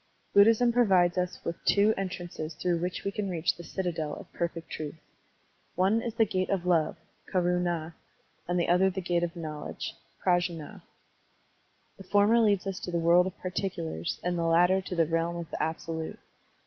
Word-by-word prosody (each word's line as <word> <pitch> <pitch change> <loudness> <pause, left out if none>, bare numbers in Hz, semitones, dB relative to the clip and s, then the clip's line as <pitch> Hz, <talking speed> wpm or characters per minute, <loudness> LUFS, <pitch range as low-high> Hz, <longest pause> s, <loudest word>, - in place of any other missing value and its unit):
♦ - - -39
♦ - - -40
♦ - - -41
Buddhism 225 +4 +6
provides 190 -7 +4
us 180 0 -2
with 170 - -4
two 205 +2 +4
entmnces 175 -4 -5
through 175 -2 +1
which 180 +1 -3
we 200 - -1
can 200 -1 -3
reach 175 -1 0
the 170 - -10
citadel 165 -3 -3
of - - -12
perfect 170 -1 -4
truth. 155 -1 -5 0.8
One 195 +5 +3
is 235 -2 -4
the 225 -1 +4
gate 185 -2 -1
of 185 -3 0
love 170 -3 +2 0.3
(karund) 180 -1 +1 0.8
and 175 +1 +1
the 170 - +1
other 180 +2 +4
the 190 0 -4
gate 175 -1 0
of 170 0 -2
knowledge 155 -3 -5 0.3
(prajnd). 175 -4 0 1.2
The - - -9
former 205 +4 +4
leads 205 -4 +3
us 195 -1 -3
to - - -6
the 170 - 0
world 170 +2 +4
of 190 - -7
particulars 85 - -3
and 175 -1 -1
the - - 0
latter 175 +3 +4
to 185 -1 -5
the 165 -1 +3
realm 165 +2 0
of 170 -1 -6
the - - -3
absolute. 160 0 -3
180 Hz, 185 wpm, -29 LUFS, 170-190 Hz, 1.2 s, Buddhism